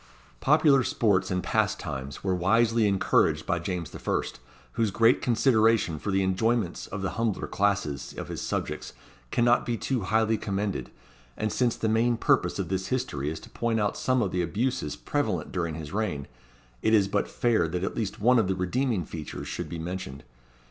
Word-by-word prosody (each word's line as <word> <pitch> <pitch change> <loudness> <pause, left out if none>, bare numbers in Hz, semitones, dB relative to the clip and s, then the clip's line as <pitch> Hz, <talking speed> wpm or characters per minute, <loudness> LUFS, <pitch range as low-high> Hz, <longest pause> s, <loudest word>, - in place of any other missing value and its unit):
Popular 145 -2 +4
sports 95 -7 +1
and 90 -1 -1
pastimes 70 -1 -2
were 95 -1 +1
wisely 110 +5 +3
encouraged 100 -1 +2
by 85 0 0
James 90 -2 -4
the - - -9
First, - - -2 0.3
whose 110 - 0
great 115 +5 +4
consideration 115 - +3
for 100 - -4
the 95 0 +2
enjoyments 95 0 0
of 95 -1 -5
the 95 - -1
humbler 110 -4 0
classes 100 -8 -1
of - - -5
his - - -5
subjects - - -3 0.4
cannot 120 - +3
be 120 -1 -2
too 130 +2 -1
highly 110 +2 +1
commended; 100 0 -2 0.5
and 110 -1 -1
since 120 -2 +1
the 110 - -2
main 115 +2 +2
purpose - - +2
of - - -3
this 95 0 -2
history 100 - -2
is 80 - -5
to - - -13
point 115 -1 0
out 105 -1 0
some 130 -2 +1
of 95 - -2
the 90 - 0
abuses 105 - -1
prevalent - - -2
during 85 -3 -2
his 75 0 -7
reign, 100 -10 -2 0.5
it 110 - +4
is 100 -2 +4
but 100 +1 0
fair 115 -8 +1
that 90 +2 -3
at - - -2
least 105 -4 -3
one 120 +3 +5
of 110 - +2
the 95 - 0
redeeming 100 - 0
features 80 -2 -7
should - - -4
be 85 - -5
mentioned. 85 -4 -6
100 Hz, 185 wpm, -27 LUFS, 90-115 Hz, 0.5 s, one